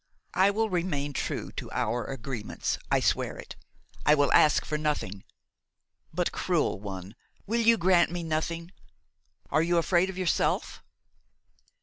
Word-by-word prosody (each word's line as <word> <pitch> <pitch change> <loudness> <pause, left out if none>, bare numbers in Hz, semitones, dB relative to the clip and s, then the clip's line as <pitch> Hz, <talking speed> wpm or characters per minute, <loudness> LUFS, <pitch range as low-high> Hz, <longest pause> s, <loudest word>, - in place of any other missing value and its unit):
I 190 +2 +4
will 220 +2 +1
remain 155 -5 -1
true - - -3
to - - -7
our 120 0 -1
agreements, 125 -4 -4
I - - +3
swear - - 0
it. - - -9 0.5
I 150 - +6
will 145 -2 +2
ask 150 - +5
for 155 - -3
nothing. 150 -11 -2 0.9
But, 175 +2 -1
cruel 170 - 0
one, 95 -1 -7 0.3
will 230 +3 0
you 230 0 +5
grant 180 -1 +4
me 175 0 -4
nothing? 165 +2 -2 0.8
Are 155 - +3
you 170 +1 +2
afraid 175 +2 +3
of 190 - -7
yourself?" 185 -3 0
165 Hz, 140 wpm, -28 LUFS, 140-180 Hz, 0.9 s, I